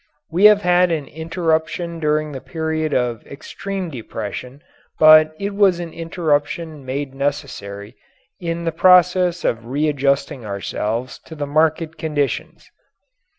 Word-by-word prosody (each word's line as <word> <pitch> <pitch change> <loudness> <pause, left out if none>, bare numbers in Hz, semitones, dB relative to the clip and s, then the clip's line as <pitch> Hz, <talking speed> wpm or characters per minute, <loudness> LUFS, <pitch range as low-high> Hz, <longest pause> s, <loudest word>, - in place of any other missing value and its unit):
We 180 +5 +3
have 210 -1 +7
had 180 0 +4
an 155 -4 -1
interruption 165 +1 -2
during 150 -1 0
the 135 -2 -7
period 160 -1 -2
of 120 -4 -1
extreme 185 +5 -6
depression 125 +2 -7 0.3
but 155 0 +7
it 200 +3 -3
was 195 -3 +3
an 170 -2 -6
interruption 160 -2 -2
made 135 +1 -4
necessary 125 -7 -4 0.4
in 170 -1 -3
the 165 - 0
process 180 0 +4
of 115 0 -1
readjusting 140 -1 0
ourselves 105 +4 -4
to 160 - -10
the 145 -1 -3
market 155 +2 0
conditions. 150 -3 -3
155 Hz, 125 wpm, -20 LUFS, 140-170 Hz, 0.4 s, have